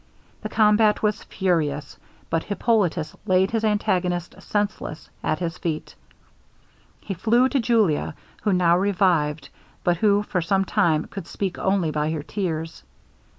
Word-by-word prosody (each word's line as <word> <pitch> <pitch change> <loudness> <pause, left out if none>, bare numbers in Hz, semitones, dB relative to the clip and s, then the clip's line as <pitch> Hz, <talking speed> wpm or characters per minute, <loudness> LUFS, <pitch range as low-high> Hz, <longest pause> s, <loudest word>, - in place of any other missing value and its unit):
The - - -5
combat 210 0 +3
was 210 0 +1
furious, 155 -6 -1 0.4
but 165 - 0
Hippolitus 205 -6 0
laid 185 +1 +3
his 225 -1 0
antagonist 180 -5 0
senseless 205 -7 -3
at 155 - 0
his 170 +1 -4
feet. 160 -2 -3 1.1
He 200 - -4
flew 235 +8 +3
to 275 - +1
Julia, 220 -12 +1 0.3
who 210 - +1
now 175 -2 +4
revived, 175 -6 +1 0.3
but 175 -1 +2
who 205 +2 +3
for 185 -3 -1
some 195 +3 +1
time 175 -7 +2
could 195 - -8
speak 195 -3 -3
only 190 -4 +1
by 150 0 -1
her 155 -2 -3
tears. 165 -3 -4
185 Hz, 140 wpm, -24 LUFS, 165-210 Hz, 1.1 s, now